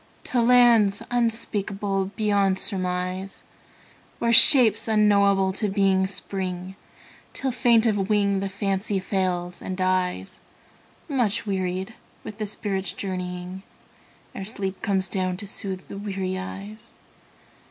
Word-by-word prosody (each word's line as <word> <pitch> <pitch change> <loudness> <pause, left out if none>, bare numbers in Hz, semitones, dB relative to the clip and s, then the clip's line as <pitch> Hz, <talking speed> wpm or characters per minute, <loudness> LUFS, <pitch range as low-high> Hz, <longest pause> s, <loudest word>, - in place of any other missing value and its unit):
To 245 - 0
lands 235 -4 +4
unspeakable 205 -4 -1
beyond 200 -3 +1
surmise, 185 0 -2 0.7
Where 235 0 +1
shapes 235 -2 +7
unknowable 200 -3 +3
to 205 +2 -1
being 195 -1 +2
spring, 185 -1 -4 0.6
Till, 270 -1 -2
faint 235 -2 +3
of 205 -3 0
wing, 200 -2 +2
the 195 0 -3
Fancy 195 +1 -2
fails 180 -2 -2
and 185 - -5
dies 185 - -1 0.7
Much 245 -10 0
wearied 190 +1 -3 0.3
with 210 +1 -9
the 215 - -2
spirit's 195 -2 -3
journeying, 180 -1 -5 0.7
Ere - - -6
sleep 195 -2 -3
comes 190 -1 0
down 185 -1 -2
to 205 - -7
soothe 195 -2 -5
the 200 - -8
weary 190 -2 -3
eyes. 200 +4 -8
195 Hz, 120 wpm, -24 LUFS, 185-215 Hz, 0.7 s, shapes